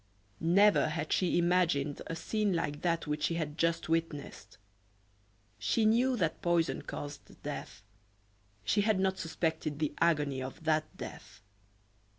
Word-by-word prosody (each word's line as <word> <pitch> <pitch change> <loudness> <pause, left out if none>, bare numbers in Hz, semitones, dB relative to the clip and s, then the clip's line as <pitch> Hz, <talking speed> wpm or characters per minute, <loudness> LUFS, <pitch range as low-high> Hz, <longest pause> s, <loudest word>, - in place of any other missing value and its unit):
Never 200 +5 +5
had 155 0 -2
she 180 -2 +2
imagined 170 -5 +2
a 165 - -3
scene 210 +3 0
like 150 -3 -2
that 170 -1 0
which 150 0 -2
she 165 - +1
had 155 -3 -3
just 165 0 0
witnessed. 165 -3 -3 1.0
She 215 - +1
knew 245 +4 +3
that 165 -6 -1
poison 170 -1 +1
caused 145 -1 -8
death; - - -6 0.8
she 110 - +2
had 210 -2 +2
not 190 0 +1
suspected 160 -2 -2
the 150 -1 -1
agony 145 -5 +2
of 130 +4 -7
that 155 -1 0
death. - - -9
165 Hz, 140 wpm, -32 LUFS, 150-180 Hz, 1.0 s, Never